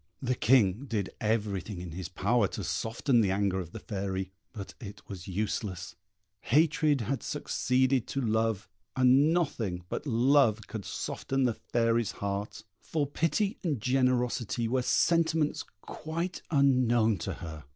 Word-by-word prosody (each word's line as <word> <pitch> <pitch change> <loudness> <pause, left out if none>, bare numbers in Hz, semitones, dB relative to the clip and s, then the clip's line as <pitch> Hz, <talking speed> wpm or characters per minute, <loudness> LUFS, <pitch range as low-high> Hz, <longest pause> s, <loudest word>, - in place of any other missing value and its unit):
The 130 -1 0
King 115 -1 +3
did 105 -6 -2
everything 105 -3 -1
in 90 -1 -7
his 90 +1 -6
power 100 +4 +2
to - - -6
soften 120 +2 +1
the 100 - +2
anger 95 -1 +1
of 85 -3 -6
the - - -7
Fairy; 95 -2 -4 0.2
but 100 -4 -8
it 105 -3 -9
was 95 -3 -8
useless; 95 -2 -3 0.5
hatred 150 +1 +2
had 130 +5 -2
succeeded 130 -3 0
to 140 - -3
love, 110 -4 0 0.3
and 130 +4 +5
nothing 115 - -1
but 150 - -4
love 120 -3 +3
could 110 -3 -7
soften 135 0 -2
the 120 -2 +2
Fairy's 115 -1 0
heart; 100 +2 -4 0.2
for 155 -3 -1
pity 165 - 0
and 155 -9 -1
generosity 125 -3 +1
were 130 +2 +1
sentiments 160 +2 +2 0.2
quite 165 +3 -5
unknown 125 - +3
to - - -3
her. 80 -2 -8
115 Hz, 140 wpm, -29 LUFS, 100-135 Hz, 0.5 s, and